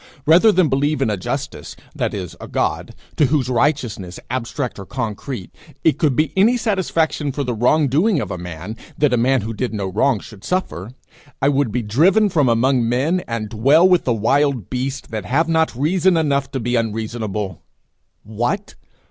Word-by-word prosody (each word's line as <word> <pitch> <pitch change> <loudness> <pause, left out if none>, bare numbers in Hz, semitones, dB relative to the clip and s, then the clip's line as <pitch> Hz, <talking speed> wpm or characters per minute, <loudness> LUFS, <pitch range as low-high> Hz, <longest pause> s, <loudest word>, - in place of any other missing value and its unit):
Rather 175 +8 +6
than 185 -4 +3
believe 145 +2 0
in 135 -5 +1
a - - 0
justice 135 +9 -5 0.2
that - - -2
is, 90 -5 -6
a - - -7
God - - -2 0.2
to 150 - +4
whose 130 -3 0
righteousness, 120 - -1
abstract 125 -1 -3
or 100 - -7
concrete, 115 -3 -5 0.3
it 150 -3 +2
could 145 -5 +2
be 155 +4 +1
any 220 +6 +4
satisfaction 165 - 0
for 140 +2 -3
the 125 -2 -2
wrong 135 +7 +2
doing 165 - +2
of 105 -8 -4
a 90 - -3
man 90 +4 -7 0.2
that 145 -4 +2
a - - +3
man 130 +2 +2
who 110 +2 -4
did 120 0 -3
no 100 -2 -2
wrong 105 +5 +1
should 105 -1 -13
suffer, 150 - -2 0.5
I 140 - +3
would 140 -4 +1
be 120 +2 -1
driven 180 - +3
from 150 -8 +2
among 120 0 +2
men, 140 +9 +1
and 115 -2 -3
dwell 135 - +4
with 180 -2 +3
the 125 - +1
wild 125 0 +1
beasts 130 +1 -3
that 110 -4 -5
have 155 - +1
not 160 -4 +1
reason 175 +6 +2
enough 140 -4 +1
to 135 - -1
be 120 +1 -1
unreasonable. 110 -4 -3 0.6
What! 120 - -3
130 Hz, 185 wpm, -20 LUFS, 110-155 Hz, 0.6 s, Rather